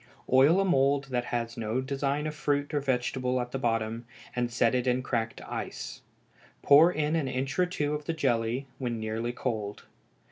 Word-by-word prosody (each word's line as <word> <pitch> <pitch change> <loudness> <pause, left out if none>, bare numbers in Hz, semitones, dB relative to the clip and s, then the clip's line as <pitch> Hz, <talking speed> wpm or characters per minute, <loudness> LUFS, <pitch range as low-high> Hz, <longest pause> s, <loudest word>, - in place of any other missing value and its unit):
Oil 140 +8 +6
a 195 - +2
mould 140 -4 +2
that 125 -1 0
has 120 0 -3
no 115 +2 -1
design 140 +2 -1
of 155 - -2
fruit 145 0 -1
or 145 - +2
vegetable 130 -1 0
at 125 0 -4
the 135 - -3
bottom, 115 -1 -1 0.3
and 120 -1 -1
set 115 0 +2
it 125 0 0
in 125 +1 +1
cracked 115 -3 -2
ice; - - -6 0.6
pour 155 +5 +7
in 155 -1 0
an 155 -4 0
inch 130 +3 -2
or 180 - +4
two 150 -4 -1
of 150 0 -4
the 165 - -1
jelly 125 -3 0
when 120 -3 -2
nearly 110 +2 -2
cold. 110 -5 -4
130 Hz, 185 wpm, -29 LUFS, 120-145 Hz, 0.6 s, pour